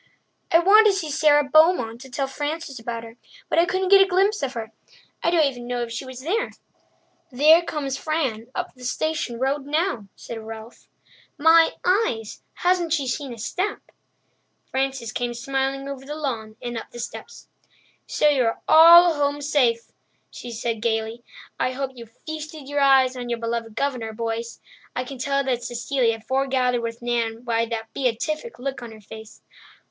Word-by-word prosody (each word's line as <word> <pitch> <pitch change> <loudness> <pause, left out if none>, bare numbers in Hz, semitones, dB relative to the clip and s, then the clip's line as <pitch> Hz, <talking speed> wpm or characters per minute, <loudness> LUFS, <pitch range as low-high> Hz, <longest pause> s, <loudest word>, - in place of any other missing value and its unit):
"I 330 - +7
wanted 420 +5 +6
to 395 - +1
see 320 -6 -3
Sara 295 0 +4
Beaumont 280 -6 +3
to 265 - -11
tell 270 +2 -2
Frances 290 0 -4
about 230 0 -5
her, 225 +1 -12 0.3
but - - +2
I 340 - +5
couldn't 375 +1 -1
get 395 0 +8
a 390 - +5
glimpse 390 +3 +2
of 270 -2 -2
her. 225 -2 -6 0.5
I - - +2
don't 335 -3 +4
even 245 -3 -4
know 245 -1 -2
if 235 - -6
she 235 +3 -5
was 260 -1 -9
there." 420 - -1 0.8
"There 305 +6 +6
comes 285 -5 -3
Fran 265 -8 -2
up - - -4
the 250 - -16
station 300 -1 -2
road 270 +3 -1
now," 305 - -1
said 230 - -8
Ralph. 225 +1 -10 0.5
"My 325 +2 +5
eyes, 360 - 0 0.2
hasn't 350 -3 +2
she 285 -5 0 0.2
a 235 - -8
step!" 365 - -2 0.9
Frances 265 -3 -2
came 240 +1 -3
smiling 270 +2 -2
over 275 -1 -6
the 295 +2 -6
lawn 230 -8 -4
and 240 -1 -3
up - - -11
the - - -12
steps. 240 - -8 0.6
"So 300 - +2
you 275 -4 +3
are 225 - -1
all 340 +2 +9
home 290 -1 0
safe," 260 -6 +1 0.4
she 245 - -9
said 230 -1 -3
gaily. 225 +1 -2 0.4
"I 255 - 0
hope 270 0 -3
you 235 -2 -11
feasted 310 +3 -8
your 290 0 -1
eyes 265 -2 +5
on 245 -1 -6
your 235 - -1
beloved 230 -1 -4
Governor, 245 -5 -2
boys. 230 +1 -4 0.3
I 250 - -1
can 260 0 -9
tell 275 +1 0
that 255 -3 -1
Cecilia 240 -1 0
forgathered 255 0 0
with 230 +1 -5
Nan 235 -1 -1
by 230 -1 0
the 225 -1 -3
beatific 305 - -2
look 270 +1 -4
on 235 -2 -8
her 220 - -12
face." 220 +1 -12
265 Hz, 175 wpm, -23 LUFS, 235-305 Hz, 0.9 s, all